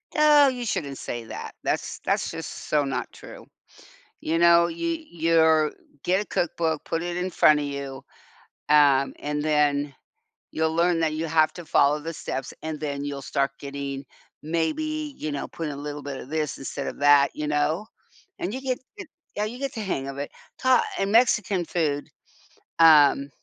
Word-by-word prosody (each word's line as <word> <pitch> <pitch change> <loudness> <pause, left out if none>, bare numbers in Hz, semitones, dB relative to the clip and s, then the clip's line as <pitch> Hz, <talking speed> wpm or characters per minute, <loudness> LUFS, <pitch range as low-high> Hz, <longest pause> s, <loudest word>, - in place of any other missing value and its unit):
Oh, 300 -2 +6
you 250 -2 -2
shouldn't 145 -10 -3
say 120 -1 -5
that. - - -8
That's - - -2
that's - - 0
just - - -7
so 150 -1 +3
not 135 -3 -3
true. - - -12 0.8
You 165 +1 0
know, 170 0 +6
you 325 - -3
you're 160 -2 +3 0.3
get 185 +3 +1
a - - -11
cookbook, 160 -2 -1
put 165 0 -2
it 175 0 -3
in 180 +1 -2
front 150 -3 +5
of 145 - -2
you, 140 -1 -6 0.7
um, 140 -2 +4
and 150 0 -2
then 145 -2 +1 0.6
you'll 160 0 0
learn 170 0 +2
that 160 -1 +1
you 160 +1 -2
have 155 -1 +3
to 175 -2 -9
follow 145 +1 +3
the 165 +2 -6
steps, 135 -3 -5
and 155 -2 -4
then 145 -2 -3
you'll 140 -1 -4
start 135 0 -1
getting, 140 -1 -5 0.4
maybe, 295 - -2
you 155 - -4
know, 140 - -4
put 165 -2 -5
a 145 - -5
little 145 +1 -6
bit 140 -2 -5
of 130 - -10
this 155 -3 -2
instead 140 +1 -5
of - - -6
that, 145 -1 +5
you 150 - -4
know? 150 +7 0 0.5
And 190 - -3
you 260 - -4
get 260 -2 -2 0.2
eh 395 - -6 0.3
yeah, 210 +1 0
you 235 +3 -6
get 275 -1 -3
the 225 - -5
hang 135 -9 -2
of 135 - -6
it. 145 - -5 0.3
Ha 260 -1 +4 0.2
and 195 +1 0
Mexican 210 -6 +3
food, 150 -5 -1 0.7
um, 145 -3 +6
155 Hz, 180 wpm, -25 LUFS, 145-180 Hz, 0.8 s, Oh